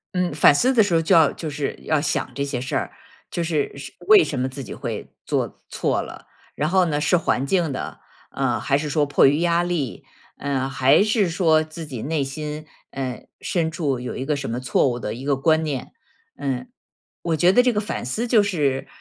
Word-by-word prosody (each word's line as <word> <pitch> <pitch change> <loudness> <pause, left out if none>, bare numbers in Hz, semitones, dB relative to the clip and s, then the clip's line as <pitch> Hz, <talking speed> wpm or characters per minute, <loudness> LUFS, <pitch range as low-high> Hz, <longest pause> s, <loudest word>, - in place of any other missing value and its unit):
嗯， 180 -4 0
反 145 -1 +6
思 255 - +3
的 230 - +5
时 185 -5 +2
候 165 - +4
就 180 +3 +3
要 160 -3 +6
就 160 - -6
是 140 0 -3
要 155 -2 +1
想 145 -3 -1
这 140 +2 -2
些 140 -3 -3
事 130 - -4
儿， - - -1 0.4
就 170 - -2
是 155 -5 -1
是 135 -1 -9
为 420 -3 +8
什 135 - -3
么 130 +1 0
自 135 +1 -7
己 - - -8
会 - - -5 0.2
做 - - -2
错 - - 0
了。 - - -10 0.3
然 150 - 0
后 185 -1 +4
呢 150 -3 0
是 150 +4 +2
环 140 -5 +1
境 170 -1 +1
的， 130 - -5 0.3
呃， 125 -5 0
还 135 +4 +1
是 150 0 -3
说 145 +1 +2
迫 145 -1 +4
于 145 +3 +2
压 170 0 +2
力， 170 -8 -2 0.3
呃， 135 -2 -1
还 140 +6 +4
是 210 -4 +2
说 160 -2 +3
自 155 +1 -8
己 130 -6 -6
内 150 -1 -1
心， 150 +2 -5 0.2
呃， 130 -2 -5
深 165 -3 -1
处 145 -6 -2
有 125 - -5
一 130 - -4
个 150 0 0
什 140 - -4
么 120 +2 -2
错 130 +1 +2
误 120 - -2
的 105 - -4
一 125 +3 -8
个 140 -1 +1
观 160 +3 +2
念。 140 -5 -4 0.5
嗯， 130 -2 -3 0.5
我 165 -2 0
觉 175 +4 +4
得 245 +5 +5
这 250 -2 +2
个 210 - 0
反 205 - -4
思 225 - -2
就 220 -3 +5
是， 145 -9 0
150 Hz, 240 characters per minute, -22 LUFS, 135-170 Hz, 0.5 s, 为